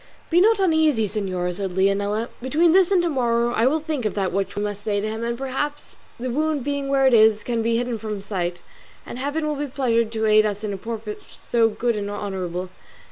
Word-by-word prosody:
"Be 345 +2 +5
not 440 +1 +4
uneasy, 315 - +3
señora," 185 -3 -2
said 190 0 -4
Leonela; 200 +4 +1
"between 310 +7 +3
this 370 0 +5
and 375 -3 +3
to - - +1
morrow 240 -4 +1
I 230 +1 +3
will 310 +4 +2
think 305 -4 -3
of 215 -1 -2
what 195 0 -1
we 205 - -1
must 205 -1 -4
say 205 -1 0
to 210 - -2
him, 220 +1 -4
and 235 0 -2
perhaps 270 +3 -4 0.2
the 250 +1 -3
wound 305 +1 0
being 285 0 -2
where 275 -1 +3
it 260 - +5
is 220 -1 +5
it - - -18
can 235 -2 -1
be 230 +1 +1
hidden 240 -1 -2
from 215 0 -4
his 200 -1 -9
sight, 175 -4 -3 0.4
and 245 - -7
Heaven 290 +4 -2
will 300 - 0
be 290 +1 -2
pleased 235 -5 0
to 220 0 -1
aid 215 0 +5
us 205 0 -2
in 210 -2 -2
a - - -4
purpose 220 0 -6
so 230 -2 +1
good 230 +2 -1
and 205 -1 -3
honourable. 185 -3 -4
230 Hz, 235 wpm, -23 LUFS, 205-275 Hz, 0.4 s, Be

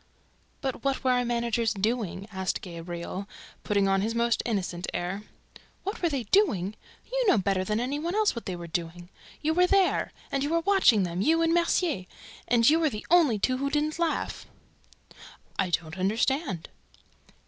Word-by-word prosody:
"But 265 -2 -3
what 275 -1 0
were 260 - +3
our 250 0 +2
managers 235 -2 0
doing?" 205 -2 -2
asked 190 -1 -2
Gabriel, 175 +2 -6 0.3
putting 200 -1 +2
on 195 0 +2
his 225 +3 -1
most 235 0 +2
innocent 180 -5 -2
air. 190 +4 -3 0.6
"What 400 +3 -4
were 345 - +2
they 275 -5 -2
doing? 210 - +2 0.4
You - - +1
know 385 - +5
better 195 -1 +1
than 210 +3 -1
any 265 +4 -2
one 340 +5 -2
what 415 - +1
they 185 - -2
were 175 -1 -7
doing!... 175 +1 -5 0.3
You 315 +1 +2
were 360 +2 +4
there!... 390 -1 +2 0.2
And 275 -1 0
you 285 - 0
were 335 +1 +2
watching 360 - +4
them, 175 0 -2
you 325 +7 +3
and 330 0 +2
Mercier!... 335 - +1 0.4
And 235 -1 +4
you 315 +2 +6
were 320 -2 +3
the 210 -5 -7
only 320 -11 +5
two 255 +5 +1
who 280 +1 -1
didn't 300 +2 -1
laugh." 335 -2 -2 1.1
"I 190 -2 +1
don't 165 +1 -2
understand!" 220 - 0
235 Hz, 175 wpm, -27 LUFS, 190-310 Hz, 1.1 s, you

